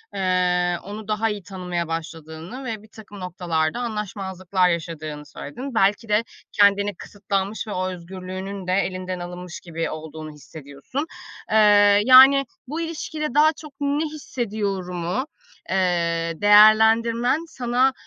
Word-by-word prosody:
ııı, 180 -2 +1
onu 205 +2 -8
daha 215 +1 0
iyi 205 -3 -5
tanımaya 180 -3 -4
başladığını 165 - -7
ve 220 -3 -5
birtakım 215 -1 -13
noktalarda 175 0 -2
anlaşmazlıklar 190 -5 -1
yaşadığını 155 -3 -4
söyledin. 245 - -8
Belki 210 +1 +2
de 210 +2 +3 0.3
kendini 200 -1 +3
kısıtlanmış 200 +2 -4
ve - - -5
o 185 0 -1
özgürlüğünün 185 +2 -7
de 185 - +1
elinden 185 -1 -2
alınmış 180 0 -7
gibi 165 -1 -4
olduğunu 155 0 -7
hissediyorsun. 150 - -7 0.5
Iıı, 205 -1 +6
yani, 265 +2 +8 0.2
"Bu 315 +5 -4
ilişkide 315 -3 -4
daha 305 +2 +5
çok 300 -2 -12
ne 285 +2 0
hissediyorum?" 200 - -4
u, 260 - -2 0.4
eee, 170 -3 0
değerlendirmen 225 +5 +5
sana, 255 -2 +1
195 Hz, 125 wpm, -23 LUFS, 175-225 Hz, 0.5 s, yani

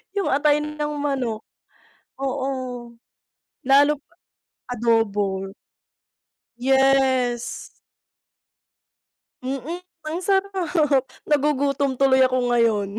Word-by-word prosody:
Yung 400 - 0
atay 295 +2 +3
ng 300 0 -4
manok. 265 -6 -2 0.8
Oo. 255 -3 -4 0.7
Lalop 285 +2 +4 0.7
adobo. 205 -5 0 1.1
Yes. 260 -2 +1 1.7
Mm, 275 +7 -4 0.2
ang 320 +3 -2
sarap. 355 -8 +1 0.2
Nagugutom 280 -2 +1
tuloy 265 -1 +4
ako 255 -1 +2
ngayon. 215 -4 +2
270 Hz, 70 wpm, -23 LUFS, 245-295 Hz, 1.7 s, Lalop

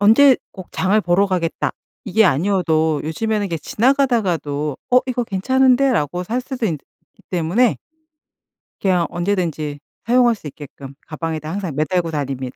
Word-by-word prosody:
'언제 250 +6 +6 0.2
꼭 185 -3 -10
장을 200 +3 +2
보러 180 +2 +2
가겠다.' 180 -3 -1 0.3
이게 220 +3 +3
아니어도 160 -2 +2
요즘에는 210 +6 -1
이게 170 -3 -3
지나가다가도 190 - 0
'어. 250 - +6
이거 245 -2 -1
괜찮은데?'라고 250 - +2
살 240 +6 -2
수도 250 -2 -3
있기 160 -7 -2 0.5
때문에 180 +8 +2 1.0
그냥 180 -3 +2
언제든지 170 -5 -2 0.3
사용할 240 0 +4
수 180 - -13
있게끔 140 -2 -10
가방에다 155 -1 -4
항상 185 -5 -4
매달고 165 +3 0
다닙니다. 135 -4 -4
180 Hz, 340 characters per minute, -20 LUFS, 155-225 Hz, 1.0 s, 언제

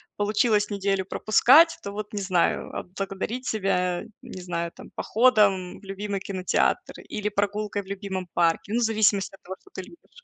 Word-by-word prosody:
получилось 210 0 +2
неделю 195 -2 0
пропускать, 270 - +5
то 200 - -5
вот, 210 +1 -6
не 205 - -2
знаю, 185 -3 0
отблагодарить 195 +6 -5
себя, 180 -4 0 0.2
не 245 -8 -9
знаю 170 -1 -3
там, - - -13
походом 210 -7 +2
в - - -26
любимый 195 0 -4
кинотеатр 190 -2 -1
или 210 0 -4
прогулкой 205 0 -1
в 190 - -20
любимом 195 -2 -5
парке, 170 +2 +1
ну, 240 - +2
в - - +1
зависимости 215 -3 +2
от - - -27
того, 190 +1 -7
что - - -23
ты 190 - -5
любишь. 345 - -17
200 Hz, 170 wpm, -25 LUFS, 190-215 Hz, 0.2 s, пропускать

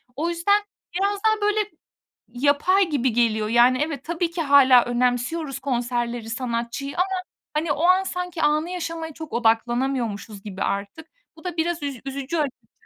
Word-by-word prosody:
o 320 +5 -1
yüzden, 345 +5 +2 0.3
biraz 400 +2 0
daha, 435 -1 +3
böyle, 420 +1 +2 0.7
yapay 290 +9 +2
gibi 260 -4 +1
geliyor. 220 -2 +1
Yani, 240 +3 +5
evet, 300 -3 -3
tabii 335 +1 -1
ki 335 0 -2
hâlâ 270 -4 +6
önemsiyoruz 250 +4 -1
konserleri, 240 -3 -2
sanatçıyı 240 +3 -3
ama, 370 +1 0 0.3
hani, 300 0 +1
o 290 - -3
an 370 +2 +5
sanki 360 -2 -4
anı 305 +3 +2
yaşamaya 330 -2 -4
çok 315 +1 -9
odaklanamıyormuşuz 230 -2 0
gibi 195 -2 -6
artık. 200 +11 -3 0.3
Bu 320 - -16
da 355 -2 -4
biraz 335 0 -1
üz 280 -4 -4
üzücü 275 +3 -4
açıkçası. 285 -4 -4
280 Hz, 155 wpm, -23 LUFS, 240-335 Hz, 0.7 s, hâlâ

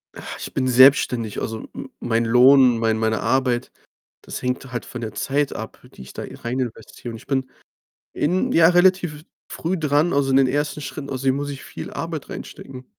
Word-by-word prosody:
Ach, - - -8
ich - - -7
bin 130 -1 0
selbstständig. 125 -3 +4
Also, 110 0 -5
me - - -8
mein 115 0 0
Lohn, 125 +1 +6
mein 115 -1 +1
meine 110 0 0
Arbeit, 130 -2 0 0.5
das - - -7
hängt 130 +1 -3
halt 120 -4 -4
von 120 - -8
der 110 -2 -5
Zeit 140 +1 0
ab, 110 0 -7
die - - -11
ich 65 - -13
da - - -6
e - - -9
reininvestiere, 120 -1 -5
und 115 - -7
ich - - -16
bin 130 -2 -1 0.6
in 185 - 0
ja, 165 0 +6
relativ 180 -2 +3
f 150 - -12 0.3
früh 180 +3 -2
dran, 150 +1 +1
also 140 -1 +1
in 135 - +5
den 135 -1 +4
ersten 145 +2 -1
Schritten, 140 0 -7
außerdem 130 0 0
muss 145 +1 -3
ich 140 -2 -7
viel - - -8
Arbeit 165 -3 -5
reinstecken. 130 -1 -9
130 Hz, 200 wpm, -22 LUFS, 120-145 Hz, 0.6 s, Lohn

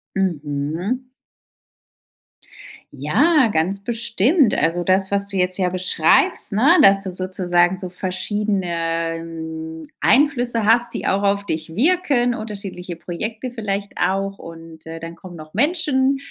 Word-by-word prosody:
Mhm. 170 - -2 1.8
Ja, 245 - +3
ganz 190 +5 -1
bestimmt. 235 - +2
Also, 165 +3 0
das, 190 +1 +2
was 200 0 +1
du 195 -1 -3
jetzt 185 +1 0
ja 180 -1 +2
beschreibst, 180 -1 +2
ne, 270 - +4
dass 195 0 +5
du 185 -2 -5
sozusagen 180 -1 +1
so 185 -2 -6
verschiedene, 180 -3 -2
hm, 160 -1 -7 0.2
Einflüsse 245 -5 +2
hast, 235 +2 +3
die - - -4
auch 195 +1 +1
auf 200 0 +1
dich 160 -1 -4
wirken, 275 - +2
unterschiedliche 200 -5 -6
Projekte 215 +9 -5
vielleicht 200 -3 -4
auch 195 +1 -1
und, 165 -1 -11
äh, 165 0 -7
dann 165 +1 -8
kommen 175 0 -12
noch 155 -1 -12
Menschen 280 -4 +1
190 Hz, 130 wpm, -20 LUFS, 165-225 Hz, 1.8 s, dass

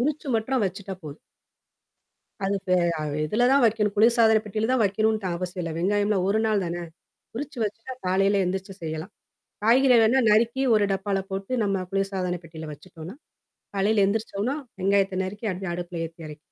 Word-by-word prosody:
உரிச்சு 300 +4 -1
மட்டும் 240 +2 0
வச்சுட்டா 190 +1 -4
போதும். 145 0 -8 1.3
அது 200 +1 +1 0.2
இ 180 - +3 0.4
இதில 225 +10 +2
தான் 275 - +5
வைக்கணும். 210 -2 +2
குளிர்சாதனப் 220 0 +4
பெட்டியில 215 +2 -2
தான் 250 -4 +3
வைக்கணும்னுதான் 210 -2 +1
அவசியம் 180 0 -4
இல்ல. 165 - -3
வெங்காயம்லாம் 205 +1 +1
1 215 +2 +2
நாள் 215 -2 +1
தான, 175 +1 -4 0.5
உரிச்சு 280 +2 -6
வச்சுட்டா 225 +5 -5
காலையில 195 +1 +3
எந்திரிச்சு 190 +1 -3
செய்யலாம். 160 +4 -5 0.5
காய்கறிலாம்னா 245 0 +5
நறுக்கி 235 +5 +3
1 210 - +3
டப்பால 195 0 -1
போட்டு 195 +3 -5
நம்ம 195 -2 -1
குளிர்சாதனப் 190 -3 -2
பெட்டியில 160 -1 -8
வச்சுட்டோம்னா, 170 +4 -11 0.6
காலையில 200 +1 +2
எழுந்திரிச்சோனா 215 +4 -1 0.2
வெங்காயத்த 195 -1 +2
நறுக்கி 205 +4 -6
அப்படியே 185 -1 -4
அடுப்புல 175 -1 -5
ஏத்தி 165 +1 -9
இறக்கிறலாம். 150 0 -9
200 Hz, 150 wpm, -25 LUFS, 185-220 Hz, 1.3 s, தான்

